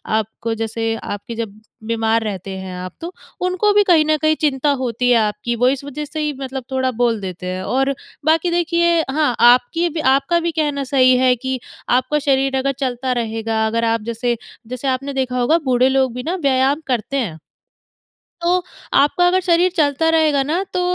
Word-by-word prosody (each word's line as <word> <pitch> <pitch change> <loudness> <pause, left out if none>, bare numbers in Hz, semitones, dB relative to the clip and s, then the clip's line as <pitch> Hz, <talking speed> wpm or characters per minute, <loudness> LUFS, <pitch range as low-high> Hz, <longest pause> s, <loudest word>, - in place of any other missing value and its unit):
आपको 220 +1 -2
जैसे 225 0 -1
आपके 205 +3 -6
जब 215 -2 -6 0.3
बीमार 225 0 +1
रहते 195 -2 -5
हैं 185 -1 -7
आप, 180 0 -7
तो 340 +2 -6 0.3
उनको 370 +3 +2
भी 415 0 +5
कहीं 335 -5 +4
न 310 0 +2
कहीं 310 0 +3
चिंता 290 -1 +1
होती 245 0 0
है 245 - +5
आपकी। 215 +2 -1
वो 245 +2 +2
इस 275 0 -2
वज़ह 295 +2 -5
से 310 +1 -6
ही 300 -1 -1
मतलब 265 -1 -5
थोड़ा 260 0 0
बोल 230 -3 +1
देते 180 -1 -6
हैं 185 0 -3
और 270 +6 0 0.3
बाकी 325 +2 +2
देखिए 340 0 +2
हाँ, 295 -4 +1
आपकी 250 +8 +4
भी 325 0 -4 0.2
आपका 340 +5 +1
भी 340 0 -1
कहना 295 -3 -1
सही 255 -1 +4
है 255 0 +3
कि 260 +1 -4 0.3
आपका 255 +4 +2
शरीर 270 -1 +1
अगर 275 +1 0
चलता 255 -1 -2
रहेगा, 225 0 -2
अगर 230 +1 -1
आप 225 0 +1
जैसे 235 +1 -1 0.3
जैसे 255 +3 -5
आपने 275 +2 -1
देखा 255 -2 -1
होगा 275 +7 +3
बूढ़े 255 +1 +4
लोग 265 -2 +1
भी 250 0 -5
ना 345 +4 -2
व्यायाम 270 +3 +2
करते 250 +2 -1
हैं। 185 -12 -3 1.0
तो 355 +1 +2 0.3
आपका 295 +6 +4
अगर 365 +1 +3
शरीर 360 0 +3
चलता 305 0 +2
रहेगा 310 -4 +3
ना 320 +7 -1
तो 365 - 0
265 Hz, 190 wpm, -19 LUFS, 230-310 Hz, 1.0 s, भी